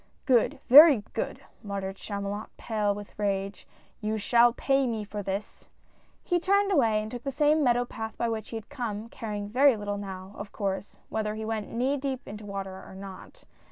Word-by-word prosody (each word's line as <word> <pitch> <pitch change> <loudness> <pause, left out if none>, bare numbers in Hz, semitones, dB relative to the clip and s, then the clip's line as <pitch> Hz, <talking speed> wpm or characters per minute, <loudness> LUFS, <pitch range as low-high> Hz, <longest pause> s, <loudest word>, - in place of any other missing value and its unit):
" - - -39
Good, 245 -4 +3
very 280 -3 +9
good! - - -3
'' - - -34
muttered 195 -2 -4
Chamulot, 200 +1 -5
pale 210 -3 0
with 205 0 -9
rage 200 -1 -2
— - - -31
" - - -38
you 215 0 -1
shall 235 +3 +5
pay 270 +2 +1
me 225 -3 -2
for 210 0 -5
this! 195 +1 -5 0.3
" - - -36
He 355 -1 +1
turned 400 +3 +2
away 225 - +3
and 215 - -7
took 245 - -6
the 275 - -3
same 300 +2 +3
meadow 245 -1 +3
path 220 -2 -6
by 235 - 0
which 220 -2 -3
he - - -6
had 220 - -9
come, 230 -6 -4
caring 210 -3 -5
very 255 +3 +4
little 205 -1 -3
now, 190 -1 -7
of 205 0 -7
course, 195 -1 -3
whether 215 -1 -2
he 220 0 -5
went 220 -1 -3
knee 260 +4 0
deep 270 -1 -4
into 210 0 -8
water, 195 -1 -5
or - - -12
not. 190 -1 -10
215 Hz, 210 wpm, -28 LUFS, 205-245 Hz, 0.3 s, very